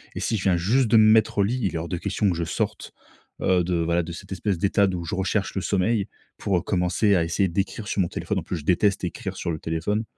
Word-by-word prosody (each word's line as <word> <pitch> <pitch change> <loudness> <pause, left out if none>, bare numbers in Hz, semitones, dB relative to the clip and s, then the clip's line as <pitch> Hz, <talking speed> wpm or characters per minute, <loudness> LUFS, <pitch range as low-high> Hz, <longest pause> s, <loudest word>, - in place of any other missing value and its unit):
Et - - -3
si 110 - 0
je 95 - -5
viens 95 -3 +3
juste 115 +9 +2
de 110 - +5
me 110 0 +7
mettre 110 -1 +3
au - - +5
lit, 120 +6 -1
il 95 -6 -1
est - - 0
hors 80 +1 -5
de 90 - -2
question 100 +3 0
que 90 - 0
je 85 - -1
sorte, 80 - -3 0.5
heu, 90 -1 +3
de 90 +1 -1
voilà, 85 +1 +1
de 85 - -7
cette 85 - -10
espèce 95 0 -1
d'état 100 +3 +2
d'où 90 -2 -3
je 80 - -4
recherche 95 +2 -1
le 95 - -1
sommeil 100 +2 0 0.3
pour 90 -4 0
commencer 95 +3 +1
à 85 - +2
essayer 90 +4 0
d'écrire 100 +4 -3
sur 100 - 0
mon 90 - +1
téléphone. - - -3
En - - -7
plus, 90 - -4
je 75 - -9
déteste 95 +3 +2
écrire 95 +2 -4
sur 90 -2 -3
le 80 - -4
téléphone 80 +8 -2
95 Hz, 270 wpm, -24 LUFS, 85-100 Hz, 0.5 s, me